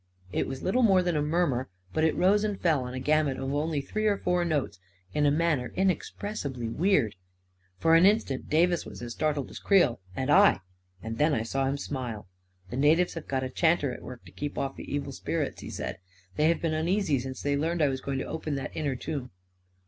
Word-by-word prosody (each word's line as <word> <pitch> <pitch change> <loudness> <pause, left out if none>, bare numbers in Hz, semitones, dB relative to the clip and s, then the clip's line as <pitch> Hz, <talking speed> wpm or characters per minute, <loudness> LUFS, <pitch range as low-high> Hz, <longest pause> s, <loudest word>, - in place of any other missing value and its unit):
It - - 0
was 135 0 -6
little 240 +8 +2
more 195 -6 +5
than 175 -2 0
a 150 - +2
murmur; 150 - 0 0.2
but 155 - +1
it 160 - +3
rose 200 +3 +3
and 205 -2 -2
fell 155 -7 +2
on 125 +1 -6
a - - -3
gamut 150 0 +2
of 135 +1 -3
only 150 0 0
three 215 +9 -1
or 205 -1 +2
four 180 -1 +1
notes 150 - -1 0.3
in 150 -1 +2
a - - +5
manner 150 -5 +1
inexpressibly 180 - -2
weird. 145 - +2 0.6
For 165 0 +3
an 165 +3 +7
instant 200 -11 0
Davis 170 +2 +3
was - - -9
as 120 - -5
startled 145 0 -1
as - - -8
Creel 185 - +3 0.2
and 130 +2 -1
I; 150 - +6 0.4
then 130 +8 +1
I 110 - 0
saw 135 +4 -1
him 140 +1 0
smile. 125 -7 -5
II 90 0 -34
The 125 - -3
natives 160 +6 +3
have 165 - -7
got 130 -1 -1
a 130 - -3
chanter 160 -4 +2
at - - -9
work 125 -1 -10
to - - -13
keep 145 -1 -5
off 135 0 -2
the - - -9
evil 140 -1 -2
spirits," - - -3
he - - -7
said. - - -5 0.2
" 90 0 -31
They 150 - +3
have 170 - 0
been 165 -1 +1
un 155 +1 -1
easy 180 -7 +2
since 130 +1 -6
they 145 0 +1
learned 165 +3 0
I 145 - +4
was 130 -1 -3
going 135 0 -3
to - - -2
open 155 -2 -3
that 135 - -5
inner 145 -4 -1
tomb." 135 -1 -4
145 Hz, 230 wpm, -28 LUFS, 130-170 Hz, 0.6 s, an